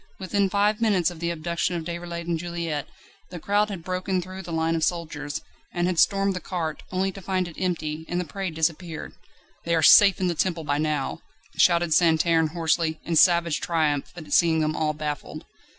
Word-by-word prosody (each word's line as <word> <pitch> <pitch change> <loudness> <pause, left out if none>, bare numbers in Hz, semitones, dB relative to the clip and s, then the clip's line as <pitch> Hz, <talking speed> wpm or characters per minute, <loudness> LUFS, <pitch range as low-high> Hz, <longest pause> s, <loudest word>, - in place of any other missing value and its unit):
Within 195 +1 0
five 210 +3 +1
minutes 195 -6 +2
of 170 - -11
the 170 0 -2
abduction 170 +1 -2
of 170 - -3
Déroulède 170 0 -5
and 170 -1 -2
Juliette 170 -4 -4 0.4
the 180 - -7
crowd 205 +5 +1
had 190 -5 -6
broken 185 +1 -2
through 185 +2 -7
the 175 -2 -9
line 165 0 0
of 160 - -1
soldiers, 155 -4 -2 0.3
and 175 0 -1
had 180 -2 0
stormed 195 0 +3
the - - -3
cart, 165 -4 -4
only 190 +1 0
to 195 - -10
find 185 -1 -1
it 165 - -10
empty, 160 -3 -2
and 175 - -1
the 180 - -2
prey 190 +5 -4
disappeared. 160 +1 -3 0.5
"They 170 0 +1
are 160 - +1
safe 200 +2 +7
in 185 - 0
the 175 - +1
Temple 170 0 -1
by 145 -1 -1
now!" 150 -3 -1 0.4
shouted 170 -2 +3
Santerne 165 0 +3
hoarsely, 160 0 0
in 170 - -1
savage 170 -1 +4
triumph 155 -4 0
at 165 -3 -7
seeing 165 -2 +4
them 155 0 0
all 155 -1 0
baffled. 150 -1 -5
170 Hz, 200 wpm, -25 LUFS, 160-185 Hz, 0.5 s, safe